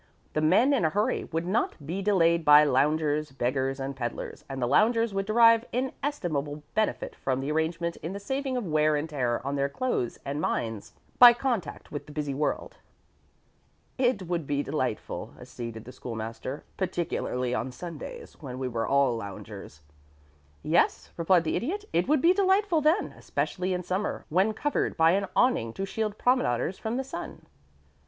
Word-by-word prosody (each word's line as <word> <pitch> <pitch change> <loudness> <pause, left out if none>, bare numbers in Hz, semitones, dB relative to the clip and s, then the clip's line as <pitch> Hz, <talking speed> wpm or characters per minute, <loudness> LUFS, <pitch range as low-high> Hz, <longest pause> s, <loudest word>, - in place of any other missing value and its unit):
The 155 - 0
men 195 - +4
in 255 - +2
a 160 - +3
hurry 205 +6 0
would 165 +1 -3
not 200 +6 0
be 175 +6 -3
delayed 170 -4 +3
by 150 0 +8
loungers, 150 +2 +1
beggars, 135 +1 -1
and 135 0 -4
peddlers, 120 -3 -5
and 135 -1 -5
the 125 - +1
loungers 225 - +3
would 195 0 -2
derive 230 +1 +6
inestimable 175 - -3
benefit 215 0 -1
from 130 -1 -1
the 135 +3 -2
arrangement 165 +2 -1
in 165 - -6
the 200 - -5
saving 265 +4 -2
of 245 - -2
wear 155 -2 +2
and 150 +2 -1
tear 130 -6 -1
on 140 +1 -1
their 140 0 0
clothes 140 - -2
and 140 +2 -3
minds 115 -8 -2 0.3
by 245 -1 +11
contact 240 - -3
with 145 - -6
the - - -10
busy 145 -2 -3
world." 150 +2 -2 1.2
"It 245 -6 +2
would 170 -4 -2
be 145 0 0
delightful," 130 -8 -3
acceded 115 -2 -8
the 125 - -9
School 120 -2 -7
master, 115 +5 -5
"particularly 130 -9 -2
on 130 +1 -2
Sundays, 180 - -8
when 130 -3 -7
they 130 - -2
were 115 -1 -2
all 140 -3 +3
loungers." 100 -6 -8 0.8
"Yes," - - +1
replied 170 0 +3
the 160 - -1
Idiot. 395 - -2
"It 175 +2 +2
would 295 -2 +2
be 345 +2 +6
delightful 385 -3 +3
then, 315 +7 +2
especially 185 0 -2
in 180 0 -1
summer, 190 +4 -2
when 190 +7 +2
covered 290 +4 0
with - - -4
an 185 +5 +4
awning 115 - +2
to 195 - -3
shield 215 +1 -3
promenaders 195 - +1
from 225 +2 -2
the 265 - -1
sun." 265 - -8
165 Hz, 175 wpm, -27 LUFS, 135-220 Hz, 1.2 s, by